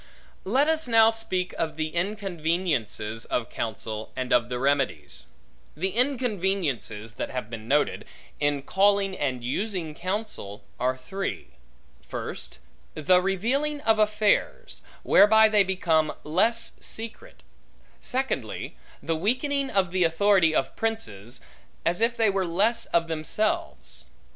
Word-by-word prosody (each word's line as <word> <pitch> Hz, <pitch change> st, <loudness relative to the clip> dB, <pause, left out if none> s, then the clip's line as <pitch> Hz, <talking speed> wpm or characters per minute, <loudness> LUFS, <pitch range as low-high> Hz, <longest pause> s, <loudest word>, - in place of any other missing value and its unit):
Let 260 Hz, +9 st, +3 dB
us 320 Hz, -3 st, +1 dB
now 225 Hz, -1 st, +6 dB
speak 190 Hz, -5 st, -1 dB
of 160 Hz, -2 st, -1 dB
the 155 Hz, 0 st, -2 dB
inconveniences 170 Hz, -, -2 dB
of 120 Hz, -1 st, -2 dB
counsel, 110 Hz, -1 st, -4 dB
and 130 Hz, 0 st, -1 dB
of 120 Hz, 0 st, +3 dB
the 125 Hz, -, -2 dB
remedies. 130 Hz, -, -1 dB, 0.5 s
The 190 Hz, +4 st, -1 dB
inconveniences 190 Hz, -, -1 dB
that -, -, -3 dB
have 125 Hz, -4 st, -5 dB
been 110 Hz, -1 st, -7 dB
noted, 145 Hz, +3 st, +1 dB, 0.3 s
in 145 Hz, -1 st, 0 dB
calling 195 Hz, +3 st, +2 dB
and 130 Hz, -6 st, -2 dB
using 175 Hz, -, -2 dB
counsel, 185 Hz, -, -4 dB, 0.2 s
are 130 Hz, +1 st, 0 dB
three. 190 Hz, +10 st, -5 dB, 0.5 s
First, -, -, -6 dB, 0.4 s
the 180 Hz, +4 st, +4 dB
revealing 250 Hz, +11 st, 0 dB
of 220 Hz, -4 st, +3 dB
affairs, 215 Hz, -, +1 dB, 0.2 s
whereby 220 Hz, +1 st, +7 dB
they 210 Hz, -2 st, +4 dB
become 170 Hz, -5 st, +1 dB
less 230 Hz, +10 st, +1 dB
secret. 230 Hz, -, -8 dB, 0.6 s
Secondly, 265 Hz, +1 st, -3 dB, 0.3 s
the 165 Hz, -, 0 dB
weakening 265 Hz, -, 0 dB
of 190 Hz, -3 st, +1 dB
the 185 Hz, 0 st, +2 dB
authority 170 Hz, -1 st, +3 dB
of -, -, 0 dB
princes, 125 Hz, -, -4 dB, 0.4 s
as 175 Hz, +5 st, +1 dB
if 235 Hz, +1 st, +2 dB
they 220 Hz, -3 st, +3 dB
were 195 Hz, -2 st, 0 dB
less 215 Hz, +7 st, +1 dB
of 170 Hz, 0 st, +1 dB
themselves. 165 Hz, +7 st, -2 dB
185 Hz, 125 wpm, -26 LUFS, 145-220 Hz, 0.6 s, whereby